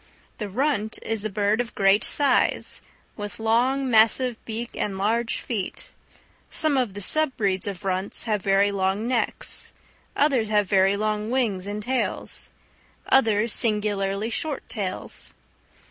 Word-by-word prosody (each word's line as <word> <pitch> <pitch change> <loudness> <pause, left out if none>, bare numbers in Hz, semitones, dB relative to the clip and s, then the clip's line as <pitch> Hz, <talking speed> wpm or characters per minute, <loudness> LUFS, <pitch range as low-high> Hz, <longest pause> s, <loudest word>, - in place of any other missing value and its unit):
The 210 -2 -4
runt 220 -1 0
is 220 -1 -2
a - - 0
bird 205 +2 +1
of 240 - -7
great 195 +1 +4
size, 285 -1 +2 0.3
with 205 0 -6
long, 245 +5 +1
massive 230 +1 +3
beak 230 +1 -5
and 195 -2 -2
large 225 +4 0
feet; 210 -6 -4 0.6
some 310 -3 +1
of 245 -7 0
the 205 - -5
sub 310 +6 +2
breeds 195 -3 0
of 195 0 -6
runts 190 +1 +1
have 215 -3 -1
very 195 +1 +3
long 195 +3 -1
necks, 245 -2 -2 0.4
others 265 -7 +2
very 200 -2 +3
long 215 0 -1
wings 220 -7 0
and 210 +1 -4
tails, 260 +3 -2 0.6
others 225 -4 +3
singularly 210 -1 0
short 290 +3 -3
tails. 195 -5 -2
215 Hz, 135 wpm, -24 LUFS, 200-240 Hz, 0.6 s, great